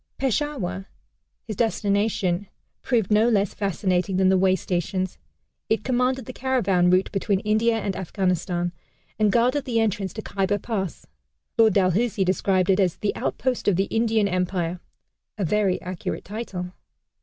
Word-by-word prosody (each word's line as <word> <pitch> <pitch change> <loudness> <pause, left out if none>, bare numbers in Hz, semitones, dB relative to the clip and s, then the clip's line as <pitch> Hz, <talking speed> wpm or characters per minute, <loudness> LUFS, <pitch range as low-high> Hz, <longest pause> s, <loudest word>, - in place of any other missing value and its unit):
Peshawar, 255 -8 -2 0.6
his 215 - -5
destination, 200 -4 0 0.3
proved 225 -6 0
no 215 +3 +5
less 205 -4 +1
fascinating 190 -1 0
than 190 0 +4
the 190 - +4
way 190 0 +4
stations. 185 +1 -2 0.5
It 220 -1 +1
commanded 255 0 0
the 255 - -7
caravan 200 -10 +2
route 185 +1 +3
between 200 -1 0
India 220 +2 +2
and 200 -3 -2
Afghanistan, 180 -1 -1 0.5
and 210 -1 +4
guarded 250 +6 +2
the 235 -3 0
entrance 205 -3 0
to 220 - -6
Khyber 200 +1 0
Pass. 195 -4 -4 0.5
Lord 220 -3 +5
Dalhousie 195 +2 +2
described 185 0 +2
it 190 - +2
as 185 -4 +2
"the 205 - -1
outpost 255 -1 -2
of 205 - +4
the 195 +2 +2
Indian 225 -2 +2
Empire" 180 -2 -1 0.6
a 200 - -1
very 195 +1 +1
accurate 180 -1 -5
title. 195 -4 -5
200 Hz, 145 wpm, -24 LUFS, 185-225 Hz, 0.6 s, no